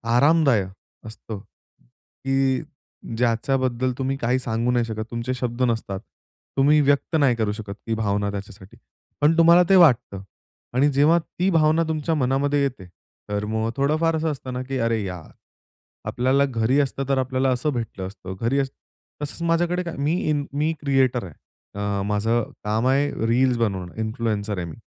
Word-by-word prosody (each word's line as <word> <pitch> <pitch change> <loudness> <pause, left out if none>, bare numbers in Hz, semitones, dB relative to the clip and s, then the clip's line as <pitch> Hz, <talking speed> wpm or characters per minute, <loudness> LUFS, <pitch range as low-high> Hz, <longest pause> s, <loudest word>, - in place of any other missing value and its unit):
आरामदायक 140 - +4 0.4
असतं. 110 -1 -8
की 130 - -4 0.6
ज्याच्याबद्दल 125 +1 0
तुम्ही 135 0 -1
काही 125 +1 0
सांगू 120 0 -1
नाही 120 -1 +1
शकत, 110 -1 -4
तुमचे 120 +2 -2
शब्द 125 -1 -4
नसतात. 115 -5 -1 0.6
तुम्ही 145 +3 +5
व्यक्त 145 +3 +1
नाही 135 -5 +4
करू 110 -2 0
शकत. 105 -1 -6
ती 115 - 0
भावना 100 -2 -1
त्याच्यासाठी 100 +2 -9 0.4
पण 155 +3 +4
तुम्हाला 170 +2 +7
ते 195 - +6
वाटतं. 125 - +4 0.5
आणि 140 +4 +3
जेव्हा 145 +5 +4
ती 180 +3 -2
भावना 160 -1 +3
तुमच्या 160 +1 -1
मनामध्ये 140 +1 +1
येते, 125 -9 -3 0.4
तर 105 0 -2
मग 110 +1 -1
थोडंफार 155 +4 +2
असं 160 0 0
असतं 130 -3 -6
ना, 125 - -3
की 135 +1 -4
"अरे 115 -2 0
यार, 90 -4 -7 0.8
आपल्याला 130 +3 +2
घरी 125 0 +1
असतं 135 0 -1
तर 135 - +2
आपल्याला 130 0 0
असं 130 +4 0
भेटलं 115 -6 -4
असतं. 95 -1 -8
घरी" 125 +5 +1 0.6
तसंच 150 +3 -5
माझ्याकडे 175 +2 +1
काय 170 - -6
मी 145 +3 +1 0.2
इन 145 -1 0
मी 150 +3 0
क्रिएटर 130 -4 +1
आहे. 85 -5 -10 0.5
अ, 100 -1 -1
माझं 110 +3 +1 0.2
काम 110 +4 0
आहे 140 +2 +2 0.2
रील्स 125 +2 +3
बनवणं, 95 -6 -2
इन्फ्लुएन्सर 110 -2 -2
आहे 85 - -3
मी. 80 - -9
125 Hz, 160 wpm, -23 LUFS, 110-140 Hz, 0.8 s, तुम्हाला